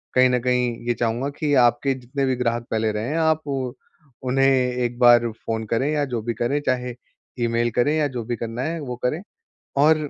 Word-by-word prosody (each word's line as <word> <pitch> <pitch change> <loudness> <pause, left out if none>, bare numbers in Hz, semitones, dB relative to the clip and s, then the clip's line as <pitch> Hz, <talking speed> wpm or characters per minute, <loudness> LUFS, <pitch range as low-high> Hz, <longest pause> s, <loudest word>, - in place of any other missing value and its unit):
कहीं 130 0 +6
न 125 - +2
कहीं 125 -1 +1
ये 120 - +3
चाहूँगा 120 +4 -1
कि 150 -2 +1
आपके 135 +3 0
जितने 130 +2 -3
भी 130 -1 +1
ग्राहक 120 -1 -1
पहले 110 -1 +1
रहे 105 +2 -3
हैं, 160 - -1
आप 160 -1 +2 0.8
उन्हें 135 +1 +2
एक 125 -2 +1
बार 120 -1 +6 0.2
फ़ोन 110 0 -2
करें 130 +5 +1
या 150 -1 +1
जो 120 -4 -3
भी 120 0 -2
करें, 120 +6 0
चाहे 125 -1 0 0.5
ईमेल 115 0 +1
करें 135 +7 +2
या 150 -2 +2
जो 125 -4 -5
भी 120 +1 -2
करना 115 +2 -4
है 165 +2 -2
वो 125 -3 -5
करें, 150 +8 0 0.6
और 150 0 +4
125 Hz, 200 wpm, -23 LUFS, 120-140 Hz, 0.8 s, कहीं